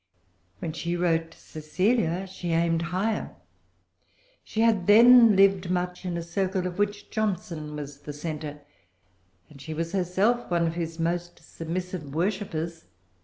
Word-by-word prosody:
When 155 +10 -5
she 170 +1 -3
wrote 165 -2 +1
Cecilia 185 +4 -1
she 180 -2 -4
aimed 165 0 +2
higher. 190 +6 -2 1.1
She 220 - -2
had 220 -6 +3
then 230 +1 +8
lived 195 -2 +4
much 180 0 -2
in 175 -1 -2
a 170 - -3
circle 185 +2 -1
of 180 +1 -4
which 205 0 -1
Johnson 175 -8 -2
was 145 -1 -7
the 150 - -7
centre; 150 -1 -6 0.9
and 140 +3 -15
she 160 +2 -6
was 165 +1 -3
herself 195 +6 +1
one 170 -1 +2
of 165 - -1
his 165 -1 -4
most 175 +1 -2 0.2
submissive 165 -3 -5
worshippers. 170 -3 -2
175 Hz, 140 wpm, -26 LUFS, 165-195 Hz, 1.1 s, then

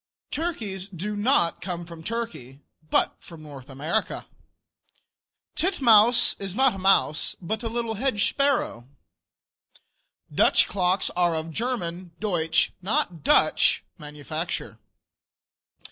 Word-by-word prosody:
Turkeys 220 - -3
do 200 +2 -5
not 205 -5 +1
come 175 -2 -5
from 165 -1 -11
Turkey, 215 - -5 0.3
but - - +2
North 150 -5 -12
America. 140 +5 -2 1.3
Titmouse 245 - +4
is 195 -1 -5
not 265 -1 +4
a 195 - -7
mouse, 185 -5 +2
but 215 +5 -4
a 230 - -3
little 230 -1 -3
hedge 220 -2 0
sparrow. 275 - 0 1.5
Dutch - - +4
clocks 185 0 0
are 175 -2 +1
of 160 +1 -4
German 180 -6 -4
(Deutsch), 170 -6 +1
not 180 -5 -1
Dutch - - +3 0.2
manufacture. 150 -4 -5
190 Hz, 105 wpm, -25 LUFS, 165-230 Hz, 1.5 s, Titmouse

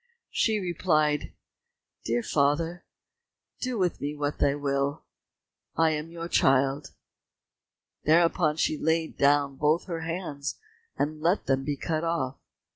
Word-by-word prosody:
She 220 -2 +2
replied, 155 -5 +1 0.7
"Dear 120 +1 0
father, 160 +4 0 0.7
do 255 -2 -2
with 180 -3 0
me 145 +1 -3
what 145 0 -3
you 140 0 +3
will, 140 +1 -1 0.7
I 165 0 +3
am 155 +1 -3
your 170 0 -6
child." 135 -1 +2 1.1
Thereupon 160 -1 +3
she 155 -1 0
laid 160 0 0
down 140 -1 +3
both 150 +4 +2
her 170 -3 -4
hands, 160 -4 -4 0.4
and 155 +1 -2
let 175 +5 +1
them 135 0 +1
be 145 0 -2
cut 155 +2 -2
off. 165 -6 -1
155 Hz, 125 wpm, -27 LUFS, 140-165 Hz, 1.1 s, you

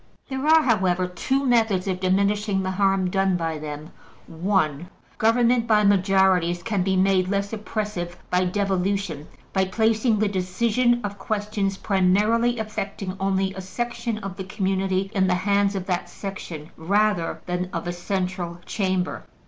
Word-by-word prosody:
There 265 +2 -2
are, 320 0 +6
however, 185 -7 +2
two 265 +10 -1
methods 225 -7 +2
of 185 -1 -1
diminishing 200 +1 +1
the 185 - -1
harm 195 -1 +1
done 195 -1 +2
by 165 -2 -2
them: 150 +1 -7 0.3
(1) 165 -3 -1 0.3
Government 235 +1 +3
by 215 -2 +4
majorities 190 -3 +3
can 210 -4 0
be 190 +1 +1
made 185 -1 +3
less 200 +1 -1
oppressive 210 -5 -4
by 180 0 +2
devolution, 190 -4 -1 0.3
by 190 -1 +2
placing 220 +3 +2
the 215 0 +2
decision 230 +6 +1
of 200 -1 -5
questions 205 -2 -2
primarily 210 +6 +2
affecting 200 -3 -4
only 190 0 0
a 190 - -6
section 235 +3 -3
of 195 -3 -7
the 190 - -4
community 190 -1 -1
in 190 -3 +2
the 180 - +2
hands 200 +2 +1
of 190 -2 -3
that 180 -2 -2
section, 170 -6 -7
rather 200 +1 +1
than 180 +1 -2
of 165 - -4
a 175 - -2
Central 180 -1 -3
Chamber. 185 -3 -1
195 Hz, 150 wpm, -24 LUFS, 185-210 Hz, 0.3 s, are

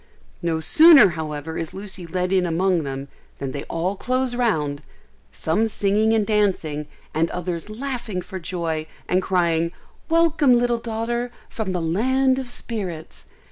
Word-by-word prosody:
No 165 -2 0
sooner 310 - +8
however 155 -1 -5
is 165 -1 -5
Lucy 190 -3 -7
led 180 +2 -1
in 185 -1 +3
among 175 +1 +1
them, 135 -1 -5 0.3
than 135 -1 -4
they 140 - -5
all 180 +4 -2
close 255 +3 -1
round, 155 -13 0 0.5
some 205 +8 +1
singing 210 +1 +1
and 220 -2 +2
dancing, 185 -9 0 0.3
and 165 +1 +1
others 180 +1 -4
laughing 235 -4 -4
for 190 0 -7
joy, 165 -2 -3 0.2
and 185 - +2
crying, 170 -3 +1 0.4
"Welcome 325 -6 +4
little 240 -1 +1
daughter, 235 +2 -2 0.2
from 215 -4 -3
the 180 -2 -1
land 260 +10 +2
of 260 -2 -6
spirits!" 190 -10 -5
190 Hz, 145 wpm, -23 LUFS, 165-235 Hz, 0.5 s, sooner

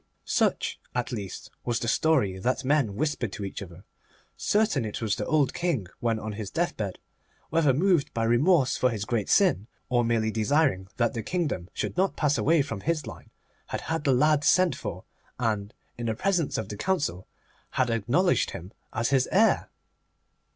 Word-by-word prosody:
Such, - - 0 0.2
at 125 +1 -1
least, 100 -6 -6
was 120 -1 0
the 115 - -3
story 125 -9 +2
that 130 +6 -1
men 135 -7 +2
whispered 140 -5 -1
to 100 -1 -4
each 95 - -6
other. 90 -1 -10 0.5
Certain 210 - +1
it 105 -2 -4
was 110 -3 0
that - - -3
the - - -6
old 150 -4 +2
King, 170 - -1
when 115 -1 0
on 110 0 -5
his 105 -1 -5
deathbed, 110 - -2 0.5
whether 160 -3 +4
moved 160 +1 +2
by 115 - -1
remorse 130 +5 +3
for 125 - +3
his 105 -4 -3
great 110 -3 -1
sin, 170 - +3 0.2
or 120 -1 +3
merely 115 -1 +1
desiring 115 -3 +1
that 120 +1 +1
the 115 - -3
kingdom 145 - -2
should - - -4
not 190 +1 +2
pass 145 -2 +2
away 160 0 +3
from 115 -7 -5
his 155 0 -1
line, - - -10 0.4
had - - -4
had 160 -2 -2
the 140 - +3
lad 150 +3 +3
sent 185 +1 +4
for, 90 - -6 0.3
and, 105 -4 -1 0.3
in 120 - -3
the 110 - 0
presence 180 - 0
of 110 -2 -4
the 105 - -6
Council, 150 - -1 0.4
had 125 -2 0
acknowledged 120 - +2
him 90 +4 -8 0.2
as 115 +3 -1
his 130 -2 +2
heir. 220 +4 +3
125 Hz, 185 wpm, -27 LUFS, 110-155 Hz, 0.5 s, whether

